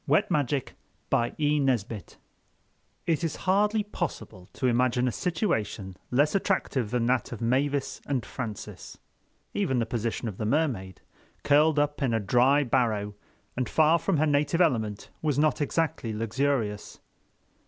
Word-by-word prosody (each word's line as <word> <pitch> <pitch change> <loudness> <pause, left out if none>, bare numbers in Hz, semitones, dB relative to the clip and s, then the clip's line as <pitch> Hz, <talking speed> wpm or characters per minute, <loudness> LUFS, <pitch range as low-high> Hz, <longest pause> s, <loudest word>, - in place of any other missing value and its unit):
CHAPTER 145 -2 +2 0.5
FOUR 120 - +2
Gratitude 135 - 0 0.9
IT 165 -1 0
IS 165 - -1
HARDLY 210 +3 +2
POSSIBLE 110 - -6
to - - -3
imagine 125 0 +2
a - - +1
situation 110 - -2
less 145 +4 +2
attractive 185 - 0
than 120 0 0
that 125 +1 +1
of 120 - -6
Mavis 135 +4 0
and 135 -5 -1
Francis—even 130 - -6
the 115 - +1
position 115 +1 -2
of 100 -4 -5
the 110 - -1
Mermaid 115 - -1 0.4
curled 150 +2 +4
up 145 0 0
in 125 -4 +1
a - - +2
dry 125 +7 +3
barrow 110 -6 0 0.4
and 125 -2 -2
far 160 +2 +4
from 165 - 0
her 155 - +3
native 150 +3 +1
element 110 - 0
was 150 -4 0
not 150 -1 +2
exactly 145 -6 -1
luxurious. 115 -1 -1
130 Hz, 135 wpm, -27 LUFS, 115-150 Hz, 0.9 s, curled